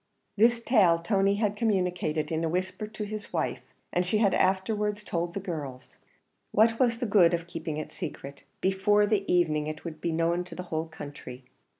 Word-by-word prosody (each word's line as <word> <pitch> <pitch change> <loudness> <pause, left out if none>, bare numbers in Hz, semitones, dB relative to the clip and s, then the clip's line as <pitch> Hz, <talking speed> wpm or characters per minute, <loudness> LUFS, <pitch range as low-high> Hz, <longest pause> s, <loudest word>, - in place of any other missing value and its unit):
This 230 +2 +4
tale 200 -9 +5
Tony 195 +3 +2
had 210 -1 0
communicated 180 -8 0
in 160 0 -1
a 165 - 0
whisper 185 +5 -2
to 215 0 -6
his 210 0 -6
wife, - - -1 0.3
and 180 - +2
she 185 +4 0
had 210 -2 +3
afterwards 205 +2 +1
told 170 -2 -3
the - - -1
girls. 150 -9 -7 0.5
What 225 +2 +4
was 240 -3 +3
the 245 - -2
good 180 -5 +5
of 170 0 -5
keeping 165 -2 -5
it 155 - -5
secret? 140 -5 -7 0.2
before 200 +2 +3
the 205 -2 0
evening 155 -4 +2
it 155 +2 -6
would 155 -2 -7
be 170 - -1
known 165 +2 +1
to - - -10
the 180 - -5
whole 160 +1 -1
country. 140 -4 -9
180 Hz, 190 wpm, -28 LUFS, 165-210 Hz, 0.5 s, tale